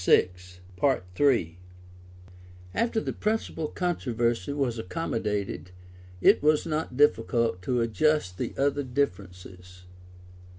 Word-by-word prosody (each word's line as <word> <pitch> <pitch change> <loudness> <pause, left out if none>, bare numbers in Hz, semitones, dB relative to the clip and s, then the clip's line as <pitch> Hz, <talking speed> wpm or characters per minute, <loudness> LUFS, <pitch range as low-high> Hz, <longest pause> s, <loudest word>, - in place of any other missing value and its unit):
21.] 95 - +1 1.2
After 230 - +1
the - - -3
principal 210 -7 -2
controversy 120 - -1
was 135 -5 -1
accommodated, 105 - -3 0.5
it - - +5
was 150 +1 +3
not 155 -5 -3
difficult 115 -7 +2
to 120 +6 0
adjust 115 -4 +1
the - - -3
other 140 +1 +1
differences. 90 -8 -4
120 Hz, 90 wpm, -27 LUFS, 95-150 Hz, 1.2 s, it